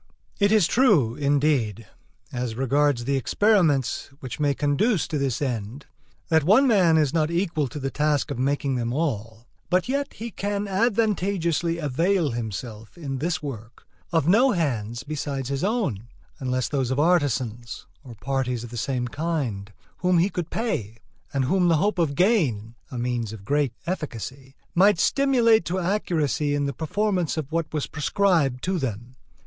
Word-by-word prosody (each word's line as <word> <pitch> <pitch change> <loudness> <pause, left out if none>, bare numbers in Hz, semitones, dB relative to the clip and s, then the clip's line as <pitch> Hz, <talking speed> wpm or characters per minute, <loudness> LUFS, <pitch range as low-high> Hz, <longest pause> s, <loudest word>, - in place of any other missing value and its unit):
It 200 0 +3
is 215 -5 +5
true, 180 - +3
indeed, 140 -6 +1 0.5
as 125 -2 -3
regards 135 0 +1
the 140 +1 +1
experiments 160 - +2
which 130 +1 -7
may 145 -2 +1
conduce 160 - +1
to 150 - -2
this 135 -1 -1
end, 120 +1 -4 0.4
that 160 -2 +4
one 215 - +5
man 185 -10 +4
is 150 -3 +2
not 155 -2 +1
equal 170 -4 0
to 125 - -8
the 135 -1 -3
task 150 -1 0
of - - -4
making 140 +1 0
them 120 0 -2
all; 115 -7 -3 0.2
but 180 0 +2
yet 280 +2 -2
he 230 +1 -7
can 205 +1 -2
advantageously 195 -6 +1
avail 165 +2 +1
himself, 110 - -6
in 135 -5 -4
this 160 +2 -2
work, 120 -4 -8 0.3
of 160 -3 +1
no 240 +8 +5
hands 120 - -2
besides 140 -3 -4
his 140 +2 -2
own, 190 - -1 0.3
unless 130 -1 -1
those 135 -4 -1
of 130 +2 0
artisans, 130 -8 0 0.2
or 125 -4 -11
parties 125 +1 -2
of 120 - -9
the 120 - -6
same 125 0 -1
kind, 125 -9 -3 0.3
whom 180 0 +2
he 180 +4 +2
could 175 -3 -4
pay, 115 - -3 0.3
and 135 -2 0
whom 180 +5 +2
the 165 -2 +4
hope 200 +3 0
of 150 -4 +1
gain 145 - +1 0.2
(a 130 - -6
means 120 -3 -2
of 105 -3 -10
great 145 -2 +1
efficacy) 135 - -5 0.2
might 195 +2 +5
stimulate 240 -3 +3
to 180 - -2
accuracy 165 -6 0
in 145 0 0
the 140 - -2
performance 180 - -1
of 155 -2 -4
what 165 -1 -1
was 150 -2 -1
prescribed 150 -4 +1
to 185 -1 0
them. 120 -1 -5
145 Hz, 165 wpm, -24 LUFS, 125-180 Hz, 0.5 s, is